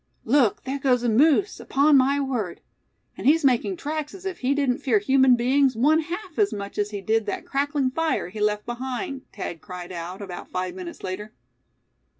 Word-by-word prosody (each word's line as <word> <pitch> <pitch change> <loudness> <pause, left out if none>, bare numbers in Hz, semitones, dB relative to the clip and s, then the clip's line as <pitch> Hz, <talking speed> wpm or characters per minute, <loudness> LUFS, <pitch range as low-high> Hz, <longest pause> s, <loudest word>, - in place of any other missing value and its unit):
"Look! 245 -3 +3
there 275 +1 -3
goes 250 -3 +2
a 240 - +2
moose, 305 - +3
upon 285 +2 +3
my 275 +1 +4
word; 245 -10 -2 0.6
and - - -3
he's 310 +1 +4
making 270 +9 +2
tracks 305 0 -4
as 385 0 -12
if 380 -1 -4
he 265 +2 +1
didn't 275 -2 +1
fear 255 -6 +2
human 260 +4 +4
beings 260 +2 +2
one 295 +7 +4
half 355 +2 -6
as 410 -1 +3
much 200 0 -6
as 205 0 0
he 205 -2 -5
did 220 +2 0
that - - -3
crackling 280 -1 0
fire 320 - -1
he 210 +3 -8
left 210 0 0
behind!" 260 +4 -4
Thad 165 - -6
cried 180 -1 -8
out, 175 +1 -6
about 190 -3 -8
five 185 0 -3
minutes 180 -2 -8
later. 210 +4 -5
255 Hz, 190 wpm, -24 LUFS, 210-285 Hz, 0.6 s, my